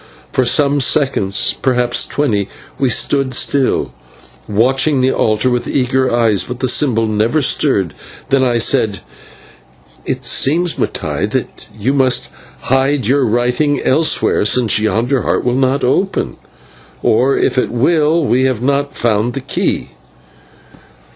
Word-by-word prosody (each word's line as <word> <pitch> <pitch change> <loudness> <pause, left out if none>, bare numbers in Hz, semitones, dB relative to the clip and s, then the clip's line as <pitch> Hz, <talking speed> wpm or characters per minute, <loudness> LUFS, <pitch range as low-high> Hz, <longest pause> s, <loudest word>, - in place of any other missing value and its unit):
For 130 - +1
some 145 +3 +2
seconds, 120 -7 +1
perhaps 125 -2 +1
twenty, 105 -9 -1 0.3
we 135 - +1
stood 135 +1 +1
still, 135 0 0 0.6
watching 135 +7 +1
the 130 +1 +2
altar 110 +2 0
with 125 0 -2
eager 130 -1 0
eyes, 115 -4 +1
but 125 0 -7
the 130 - -1
symbol 120 -4 +1
never 110 +7 0
stirred. 125 - +1 0.4
Then 135 -2 +2
I 120 -2 +1
said: 110 -4 +1 1.0
"It - - -4
seems, 170 +5 +2
Mattai, - - -2
that - - -5
you 120 +6 -1
must 130 -3 +1 0.3
hide 135 0 0
your 140 +5 +2
lying 120 -5 0
writing 125 +5 0
elsewhere, 155 -4 +1
since 110 0 +2
yonder 115 +4 0
heart - - -1
will 125 - +1
not 130 +2 0
open, 190 +10 -1 0.7
or, 130 +5 +2
if - - +1
it - - -1
will, 155 +5 +1
we 130 0 +1
have 130 -4 0
not 140 0 -1
found 115 +1 0
the - - -2
key." - - -2
130 Hz, 140 wpm, -15 LUFS, 115-140 Hz, 1.0 s, some